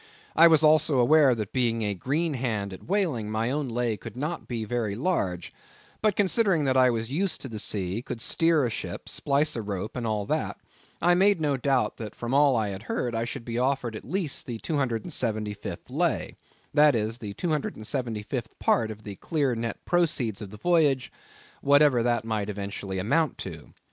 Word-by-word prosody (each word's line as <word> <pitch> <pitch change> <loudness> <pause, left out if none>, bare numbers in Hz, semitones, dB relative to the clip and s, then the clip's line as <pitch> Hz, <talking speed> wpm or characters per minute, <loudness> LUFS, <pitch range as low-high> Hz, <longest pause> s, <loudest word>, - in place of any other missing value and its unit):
I 165 +1 +8
was 160 -1 +5
also 155 -2 +4
aware 135 +1 +5
that 105 -3 -5
being 115 -3 +1
a 105 -1 0
green 150 - -1
hand 110 -7 -2
at 95 - -11
whaling, 165 - 0
my 110 +3 -1
own 145 -1 -1
lay 115 -2 -1
would 115 0 -8
not 150 +6 -4
be 115 -3 -3
very 110 -2 -2
large; 95 - -1 0.5
but 215 -3 +2
considering 195 -4 +2
that 130 -1 +2
I 130 -1 +6
was 115 0 -2
used 180 +4 -1
to - - -5
the 110 -4 -6
sea, 100 +1 -1
could 125 -2 -6
steer 165 +3 +2
a 120 - -1
ship, - - -6
splice 145 +2 0
a 115 - -2
rope, 100 -1 -4
and 120 -2 -2
all 105 -2 -1
that, - - -2 0.5
I 175 +1 +5
made 195 +1 +4
no 150 -3 +1
doubt 135 0 0
that 110 -3 -7
from 120 +2 -4
all 140 -1 +5
I 110 -3 0
had 95 0 -6
heard 120 -2 -1
I 115 0 -1
should 115 - -6
be 115 0 -2
offered 125 -3 0
at - - -7
least 170 0 -3
the 120 -2 -4
275th 115 - -2
lay—that 150 -1 +1
is, 110 +1 -1
the 100 -2 -6
275th 120 - -2
part 115 -2 +2
of 110 0 -8
the 100 -2 -7
clear 145 -6 0
net 115 0 -4
proceeds 150 - +1
of 105 - -6
the 105 - -10
voyage, 145 -2 +2 0.5
whatever 145 -3 +5
that 120 -1 +1
might 110 -2 -2
eventually 100 -1 -5
amount 145 - +1
to. 80 -5 -8
120 Hz, 190 wpm, -27 LUFS, 110-150 Hz, 0.5 s, I